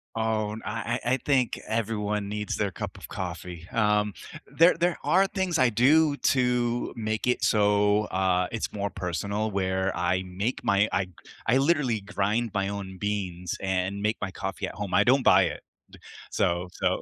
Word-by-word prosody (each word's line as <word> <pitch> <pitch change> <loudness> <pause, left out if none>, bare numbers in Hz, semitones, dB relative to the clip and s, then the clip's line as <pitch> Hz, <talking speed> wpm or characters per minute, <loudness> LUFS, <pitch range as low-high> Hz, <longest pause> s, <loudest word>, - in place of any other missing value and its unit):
Oh, 110 -1 0
and 110 - -7
I 115 +2 -2
I 120 - +1
I - - +3
think 130 -4 +2
everyone 105 -2 -1
needs 105 0 -3
their 100 -2 0
cup - - -6
of - - -9
coffee, 85 -2 -6
um, 105 -2 +2 0.3
there 170 +2 +5
there 175 0 +1
are 190 +2 +4
things 190 -4 -1
I 130 -2 +4
do 145 +6 +4
to 125 -2 +1
make 110 +1 -2
it 125 - +1
so, 105 0 +3
uh, 90 -1 +1
it's 115 - -3
more 100 -1 -2
personal 100 +4 -3
where 95 0 0
I 90 +2 0
make 95 +7 -3
my 100 +2 +3
I 95 0 0 0.4
I 125 +3 +4
literally 135 -7 +2
grind 100 +3 -1
my 100 -1 0
own 100 -2 -5
beans 95 -4 -3
and 95 +1 -1
make 105 +1 0
my 95 - -3
coffee 95 +1 -4
at - - -8
home, 100 -3 -5
I - - +4
don't 130 +1 +4
buy - - +6
it, - - -3 0.7
so 85 +1 0
so - - 0
105 Hz, 175 wpm, -27 LUFS, 95-120 Hz, 0.7 s, buy